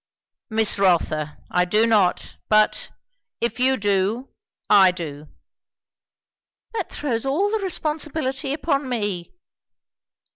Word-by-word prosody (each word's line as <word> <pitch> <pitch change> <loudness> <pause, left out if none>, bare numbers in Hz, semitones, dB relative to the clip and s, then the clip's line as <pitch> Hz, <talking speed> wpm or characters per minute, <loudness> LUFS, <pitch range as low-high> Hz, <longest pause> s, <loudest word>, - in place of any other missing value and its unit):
"Miss 220 -2 +1
Rotha, 155 -5 +1
I 180 - +3
do 210 +5 +2
not. 210 -6 +1
But 215 0 +2 0.5
if 235 +1 -2
you 260 +1 +3
do, 205 +5 0 0.4
I 195 -2 +7
do." 155 -5 -6 1.5
"That 455 - -4
throws 240 -6 -2
all 320 +10 0
the 440 - 0
responsibility 305 -6 -2
upon 285 -2 -1
me." 205 -7 -3
225 Hz, 105 wpm, -22 LUFS, 190-275 Hz, 1.5 s, I